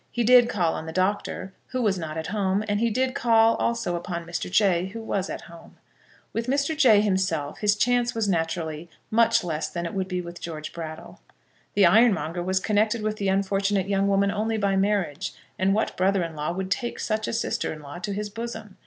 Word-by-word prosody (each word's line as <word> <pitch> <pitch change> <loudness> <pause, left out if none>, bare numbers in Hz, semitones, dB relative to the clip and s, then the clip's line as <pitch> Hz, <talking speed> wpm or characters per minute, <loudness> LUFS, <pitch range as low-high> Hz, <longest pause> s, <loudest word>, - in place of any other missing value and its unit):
He 240 - -1
did 245 +1 +6
call 175 -8 +1
on 160 - -5
the - - -4
Doctor, 190 +1 -1
who 255 - -3
was 195 -4 +1
not 160 -1 -5
at 160 - -3
home; 200 -1 0
and 205 0 0
he 235 +1 +2
did 255 +3 0
call 225 -1 +4
also 235 -7 -1
upon 170 0 -4
Mr. 170 +1 -4
Jay, 185 -2 +3
who 215 +4 -7
was 200 -4 -2
at - - -5
home. 170 0 -14 0.6
With 230 +1 -2
Mr. 280 +4 +1
Jay 240 -9 +6
himself 185 -8 -1
his 210 -1 +3
chance 245 +2 +1
was 225 -2 0
naturally 165 -2 -2 0.2
much 230 -1 +4
less 160 -3 -2
than 170 -1 -4
it 170 - -4
would 190 -1 -2
be 180 -1 -2
with 175 -1 -8
George 155 -2 -6
Brattle. 160 0 -8 0.5
The 200 - +6
ironmonger 175 -4 +3
was 190 +2 0
connected 215 +2 +1
with 215 0 -1
the 200 - -2
unfortunate 195 0 +1
young 195 0 +1
woman 200 0 +2
only 220 +2 -1
by 200 -2 +1
marriage; 195 -4 0 0.2
and 190 +1 +3
what 220 - -1
brother 190 0 +2
in 165 -1 -5
law 150 +2 -2
would 190 +2 -4
take 240 +1 -2
such 215 -1 -1
a - - -2
sister 230 - -1
in 155 -1 -8
law 145 +4 -8
to 200 +3 -4
his 205 +1 -4
bosom? 220 -2 -7
195 Hz, 215 wpm, -25 LUFS, 175-220 Hz, 0.6 s, did